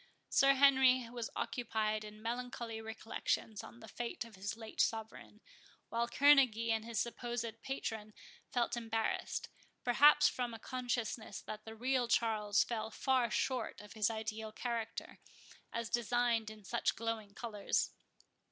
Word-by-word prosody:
Sir 275 0 +5
Henry 260 -2 +6
was 240 -2 -4
occupied 215 -3 -1
in 215 0 -10
melancholy 235 -1 -4
recollections 220 -1 -2
on 235 - -12
the 220 - -10
fate 235 +2 -4
of 230 - -14
his 200 +3 -4
late 220 -1 -2
sovereign, 220 -1 -2 0.5
while 235 +1 0
Kerneguy 255 -5 +5
and 220 -1 +1
his 230 -1 -2
supposed 240 0 -2 0.2
patron 220 -6 -4 0.3
felt 245 -3 0
embarrassed, 225 -1 -2 0.3
perhaps 295 +4 +7
from 245 -2 -2
a - - -6
consciousness 240 -4 -3
that 215 0 -7
the 220 0 -8
real 250 +1 +1
Charles 215 -3 +3
fell 220 -2 -3
far 255 +1 +1
short 260 -1 -1
of 210 0 -11
his 215 -1 +2
ideal 220 0 -4
character, 230 -1 -4 0.5
as 235 0 -2
designed 240 -1 +1
in 215 -1 -11
such 235 +4 0
glowing 225 -3 -3
colours. 215 -4 -1
230 Hz, 140 wpm, -35 LUFS, 220-245 Hz, 0.5 s, perhaps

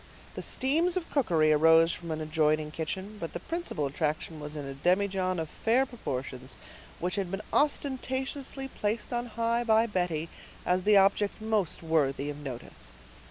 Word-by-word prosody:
The - - -5
steams 330 +7 +1
of 350 - -4
cookery 165 - +3
arose 160 +2 +6
from 170 -1 -7
an 155 0 -2
adjoining 155 -1 +1
kitchen, 190 +6 -4
but 165 - -5
the - - -3
principal 335 - -3
attraction 155 +2 -2
was 150 0 -6
in 145 -2 -5
a 135 - -5
demijohn 185 +4 +1
of 160 - -2
fair 235 - +2
proportions, 130 - -6 0.4
which 180 +3 -2
had 195 -3 -1
been 195 +3 -4
ostentatiously 270 -1 0
placed 215 0 -2
on 240 0 -1
high 230 +1 0
by 225 -1 +4
Betty 175 -6 -1 0.4
as 180 0 +1
the 210 -1 +6
object 200 +1 +3
most 215 -7 -1
worthy 145 -3 +1
of 145 - -9
notice. 125 - -7
185 Hz, 160 wpm, -29 LUFS, 155-230 Hz, 0.4 s, arose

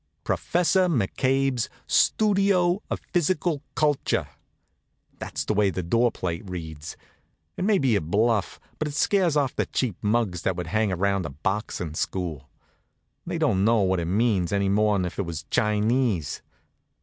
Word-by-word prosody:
PROFESSOR 180 +1 +1
M'CABE'S 130 - 0 0.2
STUDIO 195 -3 +3
OF - - -2
PHYSICAL 170 -3 +1
CULTURE 150 -2 +1 0.9
That's - - -4
the - - 0
way 105 -1 +3
the 90 0 -3
door 115 +7 +2
plate 85 -2 -4
reads. 80 -3 -7 0.6
It - - -3
may 210 -1 +4
be 130 - +2
a 100 - +1
bluff, 105 +6 0 0.2
but 155 - -1
it 145 - -6
scares 175 -3 +2
off 140 -3 0
the - - -1
cheap 120 -8 -1
muggs 105 -5 0
that 95 - 0
would 90 0 -4
hang 110 +3 0
around 95 0 0
a - - -7
boxin' 90 - -3
school. 80 -4 -3 0.8
They - - -2
don't 95 0 +2
know 115 0 +4
what 95 -1 +1
it 85 - -2
means, 100 -1 +1
any 100 -1 +1
more'n 105 -2 +2
if 90 - -6
it 100 - 0
was 80 -3 -5
Chinese. 105 - +1
105 Hz, 155 wpm, -25 LUFS, 90-135 Hz, 0.9 s, may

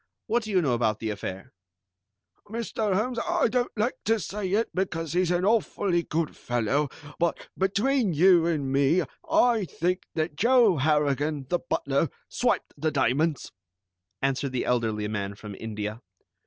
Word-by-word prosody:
What 240 +2 +1
do 220 - -7
you 185 -4 +2
know 135 -5 +2
about 110 -3 +1
the 110 -1 -2
affair?" 95 -2 -6 1.0
"Mr. 220 -2 -1
Holmes, 235 +4 0
I - - +1
don't 245 +2 0
like 220 +4 +1
to 225 +1 +2
say 195 +2 -4
it, 225 +3 +1
because 165 -4 -2
he's 180 0 +2
an 175 +1 +1
awfully 200 -4 +1
good 165 -1 -2
fellow, 120 +5 0 0.3
but 170 0 -1
between 205 +4 +1
you 175 +1 +5
and 145 -5 -1
me, 140 +6 +3 0.3
I 245 - +3
think 180 +2 -2
that 155 -1 -1
Joe 230 - +4
Harrigan, 145 0 +1
the 175 - +1
butler, 140 -2 0 0.2
swiped - - 0
the 155 +2 0
diamonds," 145 +2 0 0.7
answered 135 0 0
the 125 - -1
elderly 110 -4 0
man 100 -2 -3
from 105 -1 -9
India. 105 +1 -5
165 Hz, 155 wpm, -26 LUFS, 135-200 Hz, 1.0 s, you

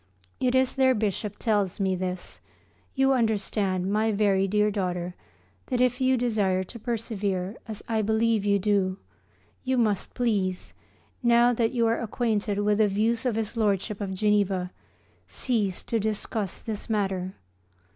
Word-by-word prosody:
It 255 0 +1
is 260 0 +2
their 260 -1 +4
Bishop 210 -1 -2
tells 205 -5 0
me 190 -1 +1
this. 180 0 -5 0.5
You 270 0 +4
understand, 205 -5 0
my 215 +2 +2
very 200 -2 +2
dear 210 +1 +2
daughter, 180 -3 -2 0.5
that 250 - -1
if 250 +1 +2
you 260 0 +3
desire 205 -6 +1
to 235 +6 -10
persevere, 210 -4 -2
as 215 -2 -6
I 225 -1 +1
believe 220 0 +2
you 200 0 +3
do, 195 -2 +1 0.7
you 260 0 0
must 215 -5 0
please, 200 -7 -1 0.5
now 240 0 +5
that 230 +1 0
you 235 -2 +2
are 230 0 +1
acquainted 220 -3 -1
with 210 0 +2
the 215 - +5
views 225 +5 +1
of 235 - 0
his 220 +1 -2
Lordship 210 -1 0
of 190 -1 -3
Geneva, 195 -3 +1 0.6
cease 210 -7 -1
to 230 - -1
discuss 215 -1 -2
this 220 -1 -6
matter. 190 -3 -1
210 Hz, 150 wpm, -26 LUFS, 195-230 Hz, 0.7 s, now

